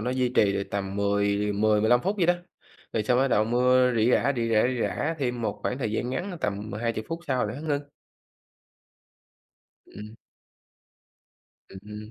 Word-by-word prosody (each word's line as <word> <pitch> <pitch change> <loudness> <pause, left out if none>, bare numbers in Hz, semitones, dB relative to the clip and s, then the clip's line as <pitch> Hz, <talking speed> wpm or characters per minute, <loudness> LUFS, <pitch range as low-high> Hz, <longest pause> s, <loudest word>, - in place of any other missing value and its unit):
nó 125 +3 -2
duy 130 -1 +1
trì 105 -5 +3
được 100 - -1
tầm 100 0 -3
mười 100 0 +1
mười, 105 +1 +2
15 120 +3 +4
phút 195 +4 -1
vậy 180 -4 +2
đó, 175 - +4 0.6
rồi 110 - 0
xong 125 +3 +2
bắt 135 +1 +3
đầu 110 -3 +3
mưa 125 +2 +3
rỉ 115 +3 +3
rả, 140 - +3
rỉ 115 -1 -1
rả, 110 -1 +4
rỉ 125 -2 -2
rả 160 +3 -1
thêm 125 -4 -2
một - - -2
khoảng 125 - -2
thời 110 -5 -2
gian 120 +3 -2
ngắn, 175 +10 -3
a, 180 - -6
tầm 105 +2 -3
20 110 +1 -2
phút 165 +1 -4
sau 130 -4 0
là - - -5
nó 140 - -7
ngưng. 145 -2 -2 2.0
Ừm. 105 +1 -11 1.5
Ừm 95 - -11
hưm. 105 +1 -8
115 Hz, 195 wpm, -26 LUFS, 105-130 Hz, 2.0 s, 15